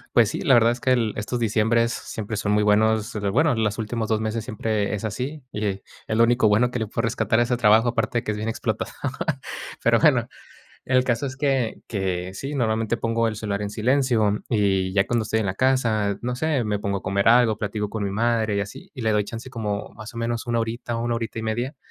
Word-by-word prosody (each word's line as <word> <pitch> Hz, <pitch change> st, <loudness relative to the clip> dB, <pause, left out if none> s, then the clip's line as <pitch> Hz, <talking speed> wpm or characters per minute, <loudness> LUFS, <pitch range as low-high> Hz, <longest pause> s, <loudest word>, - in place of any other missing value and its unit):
Pues -, -, +6 dB
sí, -, -, -4 dB
la 135 Hz, -, +5 dB
verdad 115 Hz, 0 st, +5 dB
es 120 Hz, -, -10 dB
que 130 Hz, -, +2 dB
el 115 Hz, -4 st, +2 dB
estos 120 Hz, +3 st, -3 dB
diciembres 115 Hz, +1 st, +2 dB
siempre 110 Hz, 0 st, -5 dB
son 105 Hz, 0 st, -1 dB
muy 105 Hz, 0 st, +3 dB
buenos, 110 Hz, +2 st, +3 dB
pero 100 Hz, -2 st, -1 dB
bueno, 150 Hz, +4 st, +3 dB
los 110 Hz, -1 st, 0 dB
últimos 110 Hz, 0 st, -3 dB
2 110 Hz, -1 st, +2 dB
meses 110 Hz, 0 st, -2 dB
siempre 105 Hz, -2 st, -2 dB
es 105 Hz, +1 st, -3 dB
así. 130 Hz, +8 st, -4 dB
Y 105 Hz, 0 st, -2 dB
es 95 Hz, 0 st, -3 dB, 0.4 s
lo 115 Hz, -, +6 dB
único 120 Hz, -2 st, +3 dB
bueno 115 Hz, +4 st, +3 dB
que 125 Hz, -, -3 dB
le 110 Hz, -, -2 dB
puedo 115 Hz, +3 st, -2 dB
rescatar 115 Hz, 0 st, +1 dB
a -, -, +5 dB
ese 125 Hz, +1 st, 0 dB
trabajo, 115 Hz, 0 st, +4 dB
aparte 120 Hz, 0 st, 0 dB
de -, -, 0 dB
que -, -, 0 dB
es 105 Hz, -, -4 dB
bien 110 Hz, +2 st, -2 dB
explotado. 110 Hz, -1 st, -2 dB, 0.9 s
Pero -, -, +4 dB
bueno, -, -, +4 dB, 0.6 s
el 130 Hz, -1 st, +3 dB
caso 120 Hz, +1 st, 0 dB
es 130 Hz, -1 st, -6 dB
que 135 Hz, -5 st, 0 dB
que 95 Hz, -3 st, -3 dB
sí, 135 Hz, +8 st, -5 dB
normalmente 115 Hz, -2 st, 0 dB
pongo 115 Hz, 0 st, 0 dB
el 110 Hz, -, -4 dB
celular 105 Hz, -1 st, -3 dB
en 100 Hz, -, -3 dB
silencio, 115 Hz, -2 st, +1 dB
y 95 Hz, -4 st, +1 dB
ya 100 Hz, 0 st, +2 dB
cuando 120 Hz, +1 st, +1 dB
estoy 110 Hz, +1 st, -1 dB
en 105 Hz, -, -1 dB
la 95 Hz, -, -1 dB
casa, 110 Hz, -5 st, +1 dB
no 125 Hz, +1 st, -2 dB
sé, 145 Hz, -1 st, 0 dB
me 105 Hz, -1 st, -1 dB
pongo 100 Hz, -1 st, -1 dB
a -, -, -15 dB
comer 100 Hz, +2 st, +1 dB
algo, 115 Hz, -2 st, +5 dB
platico 105 Hz, 0 st, -3 dB
con 110 Hz, 0 st, -4 dB
mi 100 Hz, -, -1 dB
madre 110 Hz, 0 st, +1 dB
y -, -, +1 dB
así. 100 Hz, 0 st, -7 dB
Y 125 Hz, -, -6 dB
le 110 Hz, -1 st, +2 dB
doy 105 Hz, 0 st, +3 dB
chance 115 Hz, +4 st, -7 dB
como, 105 Hz, -5 st, -4 dB
más 110 Hz, -1 st, -9 dB
o -, -, -10 dB
menos, 115 Hz, +1 st, -2 dB
1 120 Hz, 0 st, +1 dB
horita, 115 Hz, +1 st, -3 dB
1 120 Hz, +1 st, -1 dB
horita 115 Hz, -1 st, -4 dB
y -, -, -3 dB
media, 120 Hz, +6 st, -2 dB
110 Hz, 240 wpm, -24 LUFS, 105-120 Hz, 0.9 s, Pues